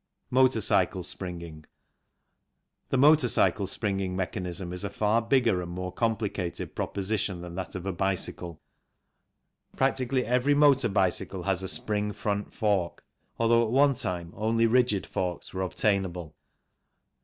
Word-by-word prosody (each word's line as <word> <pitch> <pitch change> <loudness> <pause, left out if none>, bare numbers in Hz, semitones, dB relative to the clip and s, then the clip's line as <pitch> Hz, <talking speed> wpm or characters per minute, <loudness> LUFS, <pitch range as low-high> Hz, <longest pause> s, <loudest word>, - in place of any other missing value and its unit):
Motor 130 -2 +4
cycle 95 -2 +1
Springing. 85 -3 -6 1.3
The 135 - +1
motor 145 0 +5
cycle 100 -4 +2
springing 95 -3 -2
mechanism 90 -1 -3
is 90 - -5
a 100 - -2
far 105 +3 +1
bigger 115 -5 +2
and 85 - -6
more 90 +1 -5
complicated 105 -6 -2
pro - - -2
position 100 -2 -2
than 90 -1 -8
that 95 +2 -5
of 90 0 -6
a 95 - -2
bicycle. 90 -2 -2 1.2
Practically 130 -1 0
every 125 +4 +2
motor 145 -4 +4
bicycle 95 -1 0
has 95 -1 0
a 95 - -4
spring 105 +1 0
front 100 0 -3
fork, 100 -5 -1 0.3
although 115 0 +3
at 110 - -1
one 140 +3 +4
time 90 -7 -4
only 115 +2 +1
rigid 115 -4 +2
forks 90 -2 -4
were 95 - -3
obtainable. 95 -4 -1
100 Hz, 140 wpm, -27 LUFS, 90-115 Hz, 1.3 s, motor